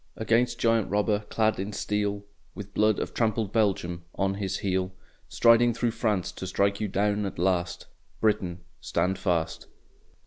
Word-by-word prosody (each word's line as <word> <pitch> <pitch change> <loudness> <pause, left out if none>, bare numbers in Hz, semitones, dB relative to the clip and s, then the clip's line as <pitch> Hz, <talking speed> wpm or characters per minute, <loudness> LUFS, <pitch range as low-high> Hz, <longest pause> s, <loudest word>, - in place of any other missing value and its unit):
Against 115 +3 +1
Giant 115 -3 +2
Robber 105 +1 +1
clad 110 -2 +1
in 100 +2 -3
steel, 100 0 -2 0.3
With 100 -1 -8
blood 105 -1 +3
of - - -4
trampled 110 -3 0
Belgium 95 -6 0
on 95 0 0
his 95 -1 -2
heel, 95 -1 -1 0.3
Striding 115 0 +5
through 120 -1 0
France 110 -5 -1
to 95 - -7
strike 100 +2 +1
you 105 - 0
down 105 +2 0
at - - -7
last, 90 0 0 0.3
Britain, 95 -5 0 0.2
stand 95 +1 0
fast! 85 -4 -1
100 Hz, 150 wpm, -27 LUFS, 95-110 Hz, 0.3 s, Striding